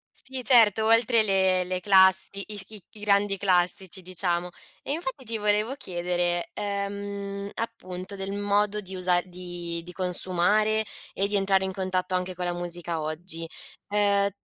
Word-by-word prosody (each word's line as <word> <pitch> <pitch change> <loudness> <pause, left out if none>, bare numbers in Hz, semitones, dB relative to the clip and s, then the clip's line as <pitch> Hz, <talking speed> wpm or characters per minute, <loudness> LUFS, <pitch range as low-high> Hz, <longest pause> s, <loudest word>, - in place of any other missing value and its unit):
Sì, 260 -1 -6
certo, 225 -4 +5
oltre 230 0 +5
le 190 -2 +3
le 180 0 -3
classi 190 0 +4
i 210 -1 -7
i 210 -4 -10
i 215 - -14
grandi 200 -1 +2
classici 185 0 +3
diciamo. 180 -1 -1 0.3
E - - -4
infatti 275 -4 -4
ti 225 -1 -4
volevo 210 +4 0
chiedere, 175 -5 -2
ehm, 200 0 -4
appunto 185 -4 -6
del 195 0 -4
modo 205 +1 +1
di 190 -1 -9
usa 180 -1 +2
di 175 -2 -6
di 180 - -10
consumare 190 +4 +1 0.3
e 195 +1 +1
di 205 - -2
entrare 195 -1 +2
in 190 - -2
contatto 185 -1 -2
anche 180 0 -2
con 180 0 -4
la 175 - -1
musica 175 -2 -3
oggi, 165 +2 -5 0.4
ehm, 200 -1 +2
195 Hz, 155 wpm, -26 LUFS, 180-205 Hz, 0.4 s, certo